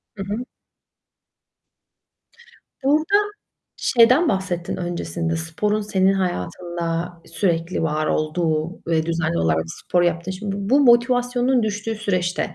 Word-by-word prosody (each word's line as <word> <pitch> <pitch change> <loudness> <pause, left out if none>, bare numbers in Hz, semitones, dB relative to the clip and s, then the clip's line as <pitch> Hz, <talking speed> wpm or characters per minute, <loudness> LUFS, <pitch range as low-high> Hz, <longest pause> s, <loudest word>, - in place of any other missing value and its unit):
Hı 195 - -5
hı. 215 +6 -4 2.4
Burada 310 +8 +3 0.6
şeyden 255 +7 +4
bahsettin 185 -3 -2
öncesinde, 170 -2 -3
sporun 175 +7 -1
senin 195 -2 +2
hayatında 175 -2 -2
sürekli 170 -1 -1
var 155 -1 0
olduğu 155 +1 0 0.2
ve 160 -1 +1
düzenli 165 0 0
olarak 80 0 +1
spor 175 - -1
yaptın 170 +1 0
Şimdi 195 +1 -4
bu 200 +2 -4
bu 280 - +5
motivasyonun 245 0 +3
düştüğü 215 +1 -2
süreçte, 185 -5 -1
180 Hz, 110 wpm, -22 LUFS, 165-215 Hz, 2.4 s, bu